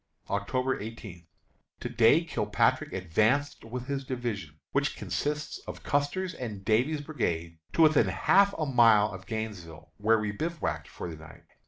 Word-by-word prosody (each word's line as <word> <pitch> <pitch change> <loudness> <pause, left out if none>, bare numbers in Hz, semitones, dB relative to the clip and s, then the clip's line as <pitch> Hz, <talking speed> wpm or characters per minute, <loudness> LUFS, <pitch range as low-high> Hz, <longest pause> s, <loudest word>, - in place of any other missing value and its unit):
October 125 +6 0
18. 105 -6 -9 0.5
To - - -3
day 120 +7 +5
Kilpatrick 165 - +1
advanced 110 - +1
with 120 +2 -6
his 140 0 -3
division, 110 - -4
which - - 0
consists 150 0 -3
of - - -7
Custer's 145 +6 0
and 105 -6 -6
Davies' 130 +8 +2
brigades, 85 - -3
to 165 - +5
within 155 -1 +5
a - - -1
half 200 +1 +4
mile 115 -8 +5
of 95 -1 -10
Gainesville, 105 -9 -6
where 110 +2 +3
we 105 -1 -1
bivouacked 160 +10 -3
for - - -7
the 80 -2 -7
night. 80 +1 -14
115 Hz, 150 wpm, -29 LUFS, 100-145 Hz, 0.5 s, day